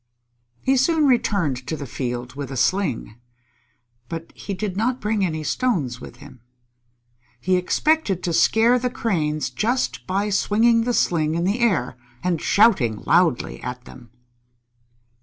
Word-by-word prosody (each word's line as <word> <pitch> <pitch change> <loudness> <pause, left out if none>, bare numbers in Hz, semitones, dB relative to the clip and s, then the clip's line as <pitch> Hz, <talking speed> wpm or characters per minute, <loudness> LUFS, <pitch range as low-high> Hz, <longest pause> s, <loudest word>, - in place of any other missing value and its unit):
He 265 0 +2
soon 310 +4 +3
returned 180 - +1
to 160 - -3
the 140 - -6
field 125 -1 -4
with 140 -1 -6
a 135 - -5
sling. 125 - 0 0.9
But 165 0 -6
he 200 - -5
did 195 -1 -4
not 245 +5 0
bring 210 -1 0
any 155 -4 -2
stones 150 - -1
with - - -10
him. 125 - -15 1.0
He 185 +9 +1
expected 195 - +1
to 170 - -1
scare 230 +8 +4
the 250 +1 -1
Cranes 155 - -1
just 245 +4 -1
by 200 +3 -1
swinging 230 +3 +3
the 245 -1 0
sling 155 -2 +1
in 170 - -1
the 200 +6 0
air, 185 - +1 0.3
and 180 -3 0
shouting 175 - +3
loudly 170 -6 +2
at 125 0 -6
them. 120 -2 -14
185 Hz, 145 wpm, -22 LUFS, 145-230 Hz, 1.0 s, scare